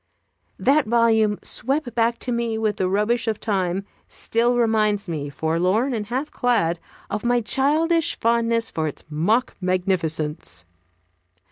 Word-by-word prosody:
That 280 0 +3
volume, 220 -2 +3
swept 265 -1 -2
back 235 0 +1
to 250 - -3
me 235 -2 -1
with 215 -2 -1
the 185 - 0
rubbish 210 +5 +1
of 220 -2 -1
Time, 190 -2 -1 0.2
still 240 +2 +1
reminds 215 -3 +2
me, 150 -4 -4
forlorn 180 - 0
and 210 -3 -3
half 260 +6 -3
clad, 205 -9 +1 0.3
of 210 - -2
my 240 0 +2
childish 305 +8 +1
fondness 230 0 +1
for 160 -1 -1
its 150 - -7
mock 205 +12 +1
magnificence. 165 - -2
220 Hz, 135 wpm, -23 LUFS, 185-240 Hz, 0.3 s, That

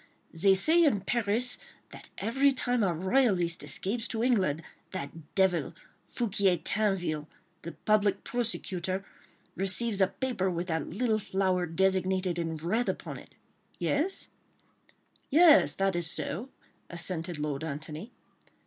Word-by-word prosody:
They 190 +4 +4
say 320 - +4
in 260 -11 +3
Paris 235 +3 +1 0.3
that - - -13
every 270 +7 +2
time 245 -2 0
a 195 -4 +2
royalist 185 -1 +1
escapes 225 +4 -2
to 225 -1 -1
England 190 - +1 0.3
that 150 +2 -7
devil, 190 -3 +1 0.3
Foucquier 200 -6 0
Tinville, 175 -6 -1 0.3
the 170 - -7
Public 210 -1 +1
Prosecutor, 190 -5 -2 0.5
receives 200 +2 +3
a 190 - +5
paper 200 -3 -2
with 175 0 -3
that 160 0 -1
little 220 +3 0
flower 190 -3 0
dessinated 185 0 0
in 165 -1 -3
red 205 +10 -1
upon - - -5
it.... - - -17 0.4
Yes?" 330 +7 -1 1.0
"Yes, 315 +1 +6
that 195 -1 0
is 175 -1 +1
so," 220 +9 -2 0.4
assented 170 -1 0
Lord 150 -1 -3
Antony. 155 - -6
190 Hz, 125 wpm, -29 LUFS, 170-230 Hz, 1.0 s, Yes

